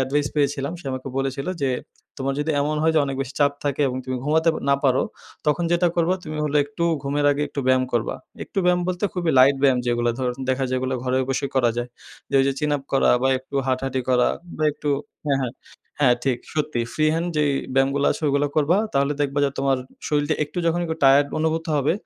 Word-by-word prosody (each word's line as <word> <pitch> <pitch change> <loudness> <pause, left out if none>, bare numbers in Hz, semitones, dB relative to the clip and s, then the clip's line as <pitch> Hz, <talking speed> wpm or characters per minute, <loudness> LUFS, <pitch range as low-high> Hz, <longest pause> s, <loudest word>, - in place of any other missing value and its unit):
Advice 140 +2 +1
পেয়েছিলাম, 140 0 0
সে - - -17
আমাকে 130 +1 -5
বলেছিল 135 +1 -2 0.2
যে, 135 - +2 0.5
"তোমার 135 +1 -1
যদি 150 +2 -1
এমন 150 +1 0
হয় 160 0 +3
যে, - - +5
অনেক 135 -1 -3
বেশি 135 +1 -9
চাপ 140 0 +4
থাকে 145 0 -1
এবং 125 - -4
তুমি 130 -1 -3
ঘুমাতে 160 +2 +2
পা - - -3
না - - +6
পারো, 130 -1 +3 0.4
তখন 160 +3 +2
যেটা 175 +1 +3
করবা, 170 +2 +2
তুমি 155 0 -5
হলো 150 0 0
একটু 145 +4 -6 0.2
ঘুমের 145 +1 -1
আগে 145 +1 0
একটু 140 - -4
ব্যায়াম 130 0 +4
করবা। 120 -2 0 0.3
একটু - - -5
ব্যায়াম 180 0 +3
বলতে 180 +3 -2
খুবই 175 -3 0
লাইট 135 +2 +6
ব্যায়াম, 130 -3 +4
যেইগুলা 120 0 +1
ধরুন 125 0 -2
দেখা 130 +1 0
যায় 130 - -4
যেগুলো 130 0 -1
ঘরে 130 +1 +1
বসে 135 +1 0
করা 120 -3 +3
যায়, 120 0 -2 0.4
যে - - -4
ওই - - +3
যে - - +1
চিন 150 -1 0
আপ 135 - -8
করা 135 - +4
বা 130 - +3
একটু 130 +2 -15
হাঁটাহাঁটি 130 0 -1
করা 125 -1 +4 0.3
বা 155 - -3
একটু 150 +1 -5 0.4
হ্যাঁ, 140 -2 +2
হ্যাঁ, 125 -2 -2 0.5
হ্যাঁ 130 -4 +5
ঠিক, 125 -3 +1 0.2
সত্যি 150 -5 -1
ফ্রি 155 0 +2
হ্যান্ড 165 +2 -1
যেই 150 -1 +2 0.2
ব্যায়ামগুলা 135 +1 +2
আছে - - -9
ওইগুলা 145 +1 +2
করবা। 155 +5 +3 0.2
তাহলে 140 +1 +2
দেখবা 145 0 0
যে 140 - +1
তোমার 135 -1 +2 0.3
শরীলটা 150 +1 +1
একটু 165 - -7
যখন 170 +1 +1
একটু 160 -1 -3
টায়ারড 140 +1 +6
অনুভূত 160 +1 0
হবে, 140 +2 +2
140 Hz, 225 wpm, -23 LUFS, 130-150 Hz, 0.5 s, না